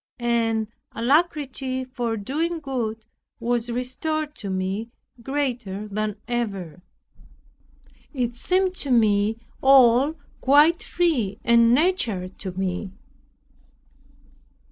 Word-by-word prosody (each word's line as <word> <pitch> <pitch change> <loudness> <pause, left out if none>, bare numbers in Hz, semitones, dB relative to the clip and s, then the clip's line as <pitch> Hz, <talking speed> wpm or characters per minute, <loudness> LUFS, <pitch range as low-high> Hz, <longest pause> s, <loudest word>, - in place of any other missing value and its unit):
An 230 -2 0 0.3
alacrity 265 -1 0
for 240 -3 -3
doing 320 +11 -2
good 230 -6 -4 0.3
was 240 0 -1
restored 295 +5 -2
to 200 - -6
me, 190 +4 -2 0.3
greater 240 -7 -3
than 210 0 -2
ever. 200 -8 -3 1.3
It 245 -4 -2
seemed 370 +8 +1
to 280 - -3
me 215 -3 +3 0.2
all 265 +2 +6 0.2
quite 295 +5 +5
free 260 - 0
and 235 0 +5
natural 250 - +1
to 190 0 -7
me. 190 +1 -3
240 Hz, 95 wpm, -24 LUFS, 215-275 Hz, 1.3 s, all